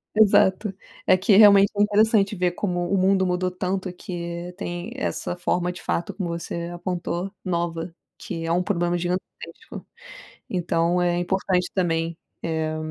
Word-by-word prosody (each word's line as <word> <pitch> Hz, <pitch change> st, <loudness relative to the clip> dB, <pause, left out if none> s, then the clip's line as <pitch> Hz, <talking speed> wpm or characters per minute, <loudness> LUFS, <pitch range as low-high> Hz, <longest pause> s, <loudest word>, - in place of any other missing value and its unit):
Exato, 205 Hz, -1 st, +4 dB, 0.4 s
é 185 Hz, -, +6 dB
que 195 Hz, +2 st, +3 dB
realmente 200 Hz, -2 st, +7 dB
é 205 Hz, -, +1 dB
interessante 210 Hz, 0 st, +3 dB
ver 180 Hz, -1 st, +1 dB
como 175 Hz, -1 st, -2 dB
o -, -, +4 dB
mundo 190 Hz, 0 st, +3 dB
mudou 180 Hz, 0 st, 0 dB
tanto 185 Hz, +1 st, -3 dB
que 175 Hz, -1 st, -6 dB
tem 175 Hz, +2 st, -5 dB
essa 270 Hz, -8 st, -3 dB
forma, 175 Hz, 0 st, 0 dB
de 180 Hz, -, -10 dB
fato, 170 Hz, -, -2 dB
como 185 Hz, -4 st, -4 dB
você 170 Hz, 0 st, -4 dB
apontou, 175 Hz, +1 st, -3 dB
nova, 170 Hz, -1 st, -2 dB, 0.2 s
que 165 Hz, -3 st, -6 dB
é 165 Hz, -, -1 dB
um 175 Hz, +2 st, +2 dB
problema 175 Hz, -2 st, 0 dB
gigantesco, 175 Hz, +1 st, -5 dB, 0.7 s
então 175 Hz, -1 st, +1 dB
é 175 Hz, -1 st, +1 dB
importante 180 Hz, 0 st, 0 dB
também, 165 Hz, -2 st, 0 dB, 0.2 s
eh, 160 Hz, -1 st, -2 dB
180 Hz, 150 wpm, -24 LUFS, 170-190 Hz, 0.7 s, realmente